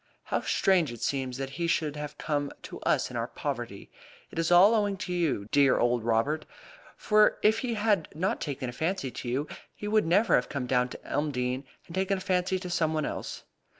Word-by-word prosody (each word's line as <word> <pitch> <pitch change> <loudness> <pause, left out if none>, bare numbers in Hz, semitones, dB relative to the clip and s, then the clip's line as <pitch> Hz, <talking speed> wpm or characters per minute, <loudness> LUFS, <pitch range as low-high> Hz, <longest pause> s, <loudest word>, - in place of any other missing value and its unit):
"How - - -1
strange 175 -8 +2
it 120 - -8
seems 130 -2 -1
that 135 0 -4
he 170 - +1
should 155 -3 0
have 150 0 -6
come 145 -2 -1
to - - -8
us - - +1
in - - -8
our - - -1
poverty. - - -5 0.4
It - - -5
is 165 - +1
all 185 +5 +8
owing 205 -3 +1
to 180 -2 -4
you, 165 -11 +1
you 100 - -11
dear 140 -2 +5
old 120 -1 +2
Robert; 120 +7 0 0.5
for 210 0 +4
if 220 +1 +4
he 240 -2 -2
had 205 -6 +1
not 180 +5 -1
taken 140 -3 -3
a 120 - -5
fancy 160 -1 -2
to 120 - -6
you, 135 +5 -1 0.3
he 210 - -6
would 215 -4 +2
never 200 +7 +3
have 125 - +3
come 135 -3 -3
down 125 0 +1
to - - -10
Elmdene 135 -2 -1 0.2
and 165 - -12
taken 190 +1 0
a - - -5
fancy 185 0 0
to 180 -1 -6
some 160 -2 +1
one 155 -1 0
else." - - -5
155 Hz, 215 wpm, -28 LUFS, 135-190 Hz, 0.5 s, all